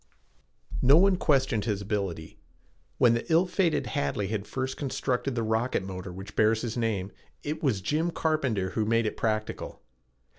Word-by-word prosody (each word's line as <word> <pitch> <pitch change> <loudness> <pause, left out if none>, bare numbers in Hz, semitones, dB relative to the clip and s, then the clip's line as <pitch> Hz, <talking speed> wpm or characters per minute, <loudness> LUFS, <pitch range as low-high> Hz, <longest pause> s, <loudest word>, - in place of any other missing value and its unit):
No 135 +4 +7
one 195 +2 +5
questioned 135 - +1
his 105 -4 -1
ability. 100 -6 -3 0.6
When 120 -3 +5
the 115 +8 -2
ill 165 +3 +5
fated 180 -2 +1
Hadley 105 -9 -1
had 105 -2 -3
first 130 0 -3
constructed 135 -2 -2
the 115 - 0
rocket 110 0 0
motor 95 0 -6
which 95 +3 -9
bears 110 +1 +3
his 115 -2 -3
name 105 -5 -1 0.3
it 150 +2 -3
was 125 -10 +1
Jim 155 - 0
Carpenter 130 - 0
who 110 - 0
made 115 +1 +2
it 105 - -2
practical. 110 -1 -3
115 Hz, 160 wpm, -28 LUFS, 105-140 Hz, 0.6 s, No